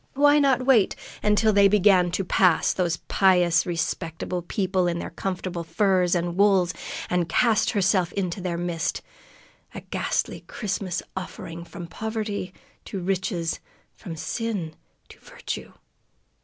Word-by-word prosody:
Why 290 +1 +5
not 265 -3 +2
wait 245 -7 +4 0.3
until 210 +1 +3
they 200 0 +6
began 195 -3 +4
to 195 - 0
pass 180 -2 +3
those 175 -3 0
pious, 180 -3 +3
respectable 170 +1 -3
people 185 0 0
in 170 -1 -1
their - - -5
comfortable 180 -1 -4
furs 180 +1 +2
and 175 0 -1
wools 195 -3 +3 0.3
and 175 -2 0
cast 225 +4 +3
herself 190 -3 +2
into 185 -1 -2
their 175 -2 -2
midst, 175 -1 -2 0.7
a - - -6
ghastly - - -2
Christmas 195 -4 -3
offering 170 -2 -6
from 175 0 -9
Poverty 215 0 -4 0.3
to 195 - -5
Riches, 180 -2 -2 0.3
from 175 -6 -8
Sin 190 -3 -3 0.3
to - - -15
Virtue? - - -7
185 Hz, 130 wpm, -25 LUFS, 175-205 Hz, 0.7 s, they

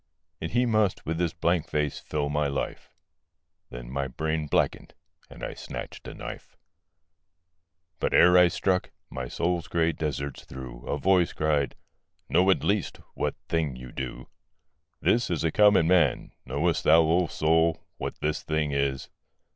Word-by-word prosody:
And - - -4
he 125 +1 +3
must 110 -4 +1
with 80 +1 -2
his 85 -2 +1
blank 85 -1 +1
face 75 -1 -1
fill 75 -1 -2
my 75 0 0
life 70 0 -4 0.8
Then - - -8
my 70 0 -2
brain 80 +4 -2
blackened; - - 0 0.3
and - - -12
I - - -3
snatched - - -8
a - - -8
knife. - - -9 1.4
But - - 0
ere 90 +1 +6
I 90 0 +8
struck, 90 +1 0 0.2
my 65 -1 -4
soul's 85 +5 -1
grey 85 -1 +1
deserts 70 -3 -4
through 60 -2 -9
A - - -1
voice 90 +2 +3
cried, 75 -3 0 0.5
'Know 95 +2 +4
at 95 - +3
least 100 -2 0 0.2
what - - -2
thing 80 -5 -1
you 65 0 -10
do.' 65 -1 -6 0.7
'This 120 +1 +2
is 85 -3 -1
a 80 - +1
common 105 -3 +5
man: 90 0 +2 0.2
knowest 75 +6 0
thou, 80 +2 +6
O 85 +2 +2
soul, 80 +1 +1
What - - -4
this 75 +2 -1
thing 75 -2 -1
is? 70 -1 -1
80 Hz, 155 wpm, -27 LUFS, 70-90 Hz, 1.4 s, I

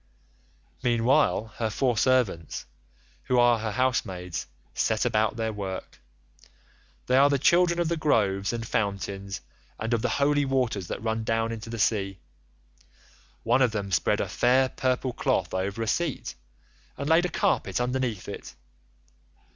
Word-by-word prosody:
"Meanwhile 120 -1 +2
her 110 -2 0
four 125 +2 +1
servants, 110 - +1 0.6
who 125 - +1
are 120 -1 +5
her 110 -1 -3
housemaids, 95 -9 -1 0.3
set - - 0
about 110 0 +1
their 110 -1 -2
work. 95 -2 -6 1.1
They 125 - +2
are 140 +1 +6
the 140 - +2
children 170 +5 +4
of 170 - +1
the 170 +1 -1
groves 100 -10 +1
and 115 -1 -4
fountains, 100 -3 -2 0.4
and 115 +2 -2
of 115 - +1
the 125 - 0
holy 145 +1 +2
waters 125 -9 0
that - - -5
run 110 0 -1
down 115 +1 0
into 115 0 -6
the 115 - -5
sea. 100 -3 0 1.3
One 120 +3 +3
of 125 -4 +3
them 100 -2 -3
spread 90 - +2
a - - -2
fair 130 +2 +3
purple 130 0 -1
cloth - - 0
over 100 +4 -2
a - - -4
seat, 165 +2 -1 0.6
and 140 - -4
laid 165 +2 +4
a - - -1
carpet - - 0
underneath 125 -4 -2
it. 100 - -8
115 Hz, 150 wpm, -26 LUFS, 105-130 Hz, 1.3 s, are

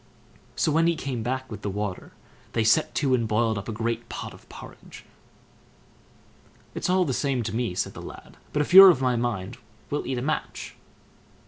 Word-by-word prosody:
So 155 - +1
when 165 +2 +3
he 170 - +2
came 135 -6 -4
back 130 +2 -3
with 105 - -7
the 105 - -3
water, 100 -1 -5 0.4
they 115 - +1
set 115 +8 +2
to 135 -3 +1
and 115 -3 +1
boiled 110 +1 +1
up 100 - -8
a - - -2
great 115 +1 -3
pot - - -6
of - - -18
porridge. - - -12 1.7
"It's - - -3
all 185 0 +3
the 135 - -1
same 135 -2 -1
to 110 0 -4
me", 115 -6 -2
said 95 - -2
the - - -9
lad; - - -11
"but 150 - +1
if 160 - -6
you're 195 0 +12
of 165 -8 +3
my 130 -2 +1
mind, 115 -3 -3 0.3
we'll 145 - -2
eat 130 -1 -2
a 120 - -3
match!" 155 - -4
125 Hz, 200 wpm, -25 LUFS, 110-145 Hz, 1.7 s, you're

